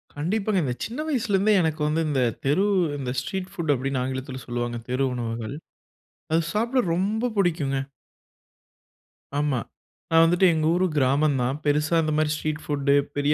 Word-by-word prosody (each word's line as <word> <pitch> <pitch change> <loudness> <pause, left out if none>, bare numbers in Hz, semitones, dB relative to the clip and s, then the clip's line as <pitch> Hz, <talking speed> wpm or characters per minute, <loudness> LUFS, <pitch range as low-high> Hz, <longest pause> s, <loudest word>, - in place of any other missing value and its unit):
கண்டிப்பாங்க. 195 +6 0
இந்த 125 -3 -1
சின்ன 235 +6 -6
வயசுல 240 -9 0
இருந்தே 210 +3 +3
எனக்கு 160 -2 -1
வந்து 155 +2 +1
இந்த 135 -3 +1 0.2
தெரு 145 +8 +3 0.3
இந்த 130 -3 -3
ஸ்ட்ரீட் 185 +7 -5
ஃபுட் 170 -6 -1
அப்டின்னு 135 0 -2
ஆங்கிலத்தில 130 0 -4
சொல்லுவாங்க. 120 -1 -3
தெரு 130 +2 +1
உணவுகள். 115 0 -4 0.8
அது 165 +1 +3
சாப்பிட 235 +5 +1
ரொம்ப 215 +7 0
புடிக்குங்க. 160 -8 +1 1.6
ஆமா. 145 -4 +1 0.5
நான் 165 0 +6
வந்துட்டு 175 +3 +4
எங்க 155 -1 0
ஊர் 185 +1 +2
கிராமம் 140 +2 +3
தான். 130 +4 -1
பெரிசா 150 +3 +2
இந்த 155 0 0
மாதிரி 155 -1 +2
ஸ்ட்ரீட் 155 0 -3
ஃபுட்டு 140 -1 +1 0.2
பெரிய 145 +1 +2
150 Hz, 155 wpm, -25 LUFS, 135-180 Hz, 1.6 s, நான்